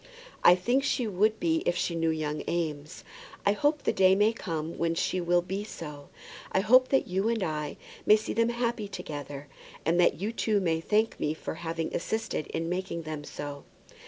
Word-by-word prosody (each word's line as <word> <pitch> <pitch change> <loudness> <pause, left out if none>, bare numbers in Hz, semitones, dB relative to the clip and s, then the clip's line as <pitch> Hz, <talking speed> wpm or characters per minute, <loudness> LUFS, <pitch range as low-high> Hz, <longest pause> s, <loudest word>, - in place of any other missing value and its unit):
"I 175 - +8
think 245 +9 +1
she 260 -3 0
would 215 +2 +1
be 160 -1 +2
if 175 - +2
she 175 - 0
knew 165 -1 +1
young 155 -1 -2
Eames. 155 -3 -3 0.4
I 200 - +5
hope 290 +7 +1
the - - +1
day 190 0 +5
may 210 +3 +3
come 165 -6 -4
when 165 0 +1
she 185 +2 0
will 175 0 +2
be 190 +3 -3
so. 150 -8 -8 0.4
I 190 - +2
hope 255 +5 +6
that 270 - +2
you 190 +4 0
and 230 -4 0
I 150 -3 -3 0.3
may 210 - +9
see 215 - -3
them 230 +1 +2
happy 235 -2 -1
together, 145 -6 -7 0.4
and 170 +2 +2
that 175 - +4
you 205 +4 -1
too 215 -2 +1
may 165 -4 0
thank 215 +5 +1
me 150 +1 0
for - - -5
having 165 0 -4
assisted 220 -5 -2
in 165 - -3
making 180 -1 -3
them 155 -1 -5
so. 145 -1 -7
180 Hz, 195 wpm, -28 LUFS, 160-215 Hz, 0.4 s, may